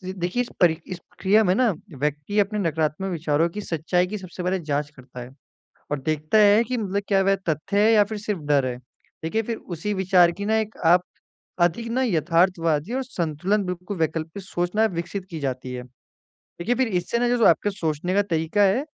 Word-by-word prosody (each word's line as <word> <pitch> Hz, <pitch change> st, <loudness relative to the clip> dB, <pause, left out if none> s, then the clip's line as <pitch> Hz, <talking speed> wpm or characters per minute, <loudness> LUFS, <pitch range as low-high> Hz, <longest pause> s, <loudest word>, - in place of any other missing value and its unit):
देखिए 180 Hz, +6 st, -1 dB
इस 245 Hz, -, -10 dB
परि 165 Hz, -3 st, +5 dB
इस 185 Hz, -, -5 dB
प्रक्रिया 205 Hz, +5 st, +1 dB
में 180 Hz, -3 st, +3 dB
ना 245 Hz, 0 st, +3 dB, 0.3 s
व्यक्ति 150 Hz, +8 st, -1 dB
अपने 210 Hz, +1 st, +1 dB
नकारात्मक 165 Hz, +1 st, -1 dB
विचारों 160 Hz, -1 st, +1 dB
की 210 Hz, +5 st, -6 dB
सच्चाई 175 Hz, 0 st, 0 dB
की 210 Hz, +3 st, -4 dB
सबसे 185 Hz, -2 st, -8 dB
पहले 185 Hz, +1 st, 0 dB
जाँच 150 Hz, -2 st, -2 dB
करता 125 Hz, -1 st, -12 dB
है, 125 Hz, +1 st, -9 dB, 0.6 s
और 145 Hz, -, 0 dB
देखता 155 Hz, +7 st, 0 dB
है 210 Hz, +1 st, +6 dB
कि 250 Hz, +2 st, -3 dB
मतलब 200 Hz, -2 st, -1 dB
क्या 195 Hz, -2 st, +3 dB
वह 195 Hz, +1 st, +3 dB
तथ्य 160 Hz, +6 st, -1 dB
है 215 Hz, +2 st, +5 dB
या 210 Hz, -2 st, +6 dB
फिर 215 Hz, +1 st, -5 dB
सिर्फ़ 205 Hz, -4 st, -3 dB
डर 140 Hz, -2 st, +3 dB
है। 125 Hz, -1 st, -4 dB, 0.5 s
देखिए 190 Hz, +8 st, 0 dB
फिर 230 Hz, +1 st, -3 dB, 0.2 s
उसी 205 Hz, +6 st, -3 dB
विचार 185 Hz, -2 st, +4 dB
की 200 Hz, +4 st, -6 dB
ना 220 Hz, +1 st, +2 dB
एक 220 Hz, 0 st, -3 dB
आप 175 Hz, +2 st, +6 dB, 0.6 s
अधिक 175 Hz, +7 st, +1 dB
ना 255 Hz, +3 st, 0 dB
यथार्थवादी 170 Hz, -, +1 dB
और 265 Hz, +1 st, -1 dB
संतुलन 185 Hz, -, -1 dB
बिल्कुल 180 Hz, +2 st, -5 dB
वैकल्पिक 160 Hz, +3 st, -2 dB
सोचना 180 Hz, +4 st, 0 dB
विकसित 180 Hz, +3 st, -4 dB
की 165 Hz, -, -5 dB
जाती 130 Hz, -2 st, -4 dB
है। 125 Hz, 0 st, -5 dB, 0.6 s
देखिए 230 Hz, +8 st, -4 dB
फिर 260 Hz, 0 st, +1 dB
इससे 200 Hz, +3 st, -1 dB
ना 245 Hz, -, +2 dB
जो 245 Hz, -2 st, +3 dB
आपके 205 Hz, -, +4 dB
सोचने 170 Hz, -2 st, -2 dB
का 205 Hz, -, +5 dB
तरीका 165 Hz, +1 st, 0 dB
है 200 Hz, +7 st, +3 dB
180 Hz, 200 wpm, -24 LUFS, 160-210 Hz, 0.6 s, है